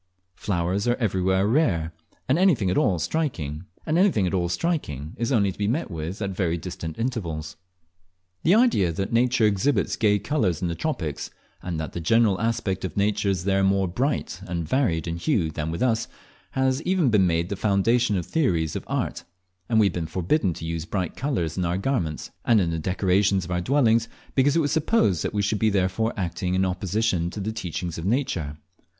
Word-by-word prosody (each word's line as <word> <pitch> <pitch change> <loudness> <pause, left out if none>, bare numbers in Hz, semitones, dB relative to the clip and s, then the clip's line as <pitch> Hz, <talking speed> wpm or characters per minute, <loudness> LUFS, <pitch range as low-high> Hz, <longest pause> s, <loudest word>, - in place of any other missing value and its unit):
Flowers 95 +3 -1
are 120 - +3
everywhere 95 -4 +1
rare, 100 - +1 0.3
and 135 +6 +2
anything 145 - +3
at - - 0
all 95 -4 +2
striking 80 - -2 0.2
is 105 - 0
only 100 -6 +3
to - - -13
be 100 - +1
met 120 0 -1
with 85 +6 -4
at 100 - -2
very 90 -3 -1
distant 85 -2 -6
intervals. 85 -11 -3 0.9
The 175 +5 +4
idea 220 - +3
that 95 +6 -3
nature 120 -1 +3
exhibits 105 +7 +1
gay 105 -2 +3
colours 100 - 0
in 90 - -1
the - - -1
tropics, 85 - -3 0.3
and 85 -2 -4
that 80 - -5
the 85 - -4
general 105 +1 +3
aspect 110 -5 -1
of 95 - -5
nature 100 0 +1
is 95 -2 -1
there 95 0 +2
more 95 0 +2
bright 95 -2 -2
and 85 -2 -3
varied 85 - +1
in 85 0 -2
hue 90 - 0
than 75 +1 -3
with 85 +6 -2
us, 115 -3 +1 0.5
has 130 +1 +1
even 180 -7 +2
been 100 -4 +4
made 85 +1 0
the 100 - -2
foundation 105 +3 +2
of 90 - -3
theories 85 - 0
of - - -3
art, - - -2 0.5
and 110 -2 +3
we 105 - +5
have 95 - +1
been 85 -2 -3
forbidden 95 - 0
to 80 - -7
use 80 -1 -3
bright 95 -2 -3
colours 115 - -2
in - - +1
our 85 +1 0
garments, 95 - -2
and 115 -3 +4
in 85 -4 +1
the 80 - -2
decorations 95 +2 +1
of 90 - -7
our 90 0 0
dwellings, 115 -1 +3 0.3
because 140 +1 +3
it 165 - +4
was 145 -2 0
supposed 155 - +2
that - - -2
we 100 - +1
should 105 +1 0
be 110 - +3
thereby 100 +3 +1
acting 90 0 -2
in 95 +1 +2
opposition 95 -1 0
to 105 - -7
the 105 +2 -2
teachings 90 -4 -4
of 80 - -5
nature. 95 - -1
95 Hz, 190 wpm, -25 LUFS, 85-115 Hz, 0.9 s, we